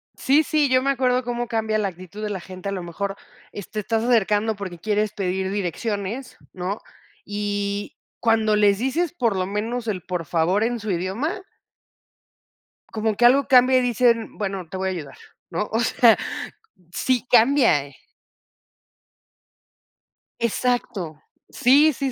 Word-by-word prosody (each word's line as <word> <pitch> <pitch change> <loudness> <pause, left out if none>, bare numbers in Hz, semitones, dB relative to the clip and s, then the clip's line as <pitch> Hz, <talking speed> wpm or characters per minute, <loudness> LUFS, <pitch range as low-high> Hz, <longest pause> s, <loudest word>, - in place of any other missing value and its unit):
Sí, 285 +4 +3
sí. 300 -1 +1
Yo 255 0 +4
me 275 - 0
acuerdo, 255 -1 +1
cómo 240 0 -3
cambia 220 -2 0
la 210 -2 0
actitud 185 +3 -9
de 210 - -2
la 195 -3 -3
gente. 185 +2 -7
A - - -3
lo 190 -2 -4
mejor, 195 +3 -4 0.4
es 205 - -8
te 215 - -4
estás 220 +2 -1
acercando, 220 -2 +2
porque 190 -3 -7
quieres 210 +2 0
pedir 190 -1 -2
direcciones, 205 +5 -3 0.2
¿no? 185 +3 -4 0.4
Y 205 0 -3 0.2
cuando 220 -2 +2
les 205 -1 +4
dices, 300 +8 0
por 235 - 0
lo 185 -1 0
menos, 225 +4 -3
el 195 -4 -2
"por 180 -2 -4
favor", 175 +6 +1
en 240 +1 -1
su 215 -1 -3
idioma 210 - -2 1.5
como 220 -1 0
que 240 - +3
algo 265 +3 +5
cambia, 255 0 +6
y 255 - +3
dicen: 240 -2 +1
"Bueno, 195 -4 -3
te 190 - -5
voy 190 0 -1
a - - -1
ayudar", 160 -6 -7 0.3
¿no? 185 +4 -2
O 225 - +1
sea, 235 -1 +5 0.8
sí 255 +4 0
cambia, 240 - +4
eh 140 -1 -15 2.4
Exacto. 230 -9 -1 0.3
Sí, 290 +5 +4
sí, 270 +1 -2
215 Hz, 155 wpm, -23 LUFS, 195-245 Hz, 2.4 s, cambia